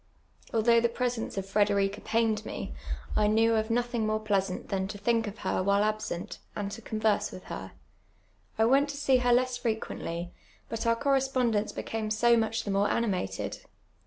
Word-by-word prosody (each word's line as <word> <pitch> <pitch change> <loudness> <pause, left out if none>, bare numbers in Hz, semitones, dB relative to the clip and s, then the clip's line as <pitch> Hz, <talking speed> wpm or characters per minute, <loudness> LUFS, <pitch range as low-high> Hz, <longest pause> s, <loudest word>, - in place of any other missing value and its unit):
Although 230 +1 +4
the 235 - +2
presence 240 -3 -2
of 195 - -2
Frederica 200 0 +1
pained 220 -1 +1
me, 65 - -5 0.4
I 210 - +3
knew 225 +2 +4
of 220 -1 +1
notliint; 240 -1 0
more 215 0 +1
])leasant 195 -3 -1
than 190 -1 -1
to 205 - -6
thiidv 230 +1 +1
of 205 - -5
licr 185 - -1
wliile 200 +1 +3
absent, 215 -3 -3 0.2
and 200 -1 -3
to 230 - -7
converse 215 -1 0
willi 185 - -9
her. - - -7 0.8
I 220 - +4
went 275 +4 +4
to 285 - -5
see 270 -2 +3
her 245 -1 +2
less 250 0 +2
frecjuently, 175 -6 -3 0.4
but 225 0 -3
our 230 - +4
correspondence 260 -5 +1
became 220 -1 -4
so 235 +2 +4
much 225 0 0
the 205 - -3
more 200 +1 +2
animated. 185 - -1
220 Hz, 175 wpm, -29 LUFS, 205-235 Hz, 0.8 s, Although